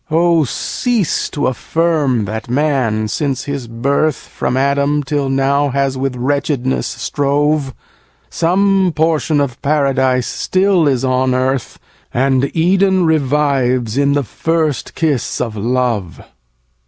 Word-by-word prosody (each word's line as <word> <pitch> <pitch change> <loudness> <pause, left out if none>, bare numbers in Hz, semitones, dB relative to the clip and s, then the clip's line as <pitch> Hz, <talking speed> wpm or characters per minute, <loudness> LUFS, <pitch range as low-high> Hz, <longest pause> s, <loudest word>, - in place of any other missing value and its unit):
6. - - -47
Oh! 165 0 +3
cease 225 - -1
to 145 - -2
affirm 140 -3 0
that 110 +3 -5
man, 125 -6 0
since 135 +3 -2
his 140 -4 -5
birth, 140 +6 0
From 125 - -4
Adam, 140 +2 +1
till 140 0 -1
now, 140 +2 +1
has 135 0 0
with 130 0 -2
wretchedness 135 0 -1
strove; 145 +3 -1 0.5
Some 190 +1 +1
portion 160 -1 +1
of 140 -4 -2
Paradise 135 -3 +1
still 185 -4 +1
is 135 -2 +1
on 130 0 +1
earth, 130 -1 -1 0.3
And 135 +1 +1
Eden 185 +2 +3
revives, 135 -6 +1
in 140 0 +2
the 145 0 +1
first 160 +3 -2
kiss 150 -7 -1
of 115 -3 -3
love. 115 -4 -1
140 Hz, 125 wpm, -16 LUFS, 130-155 Hz, 0.5 s, Oh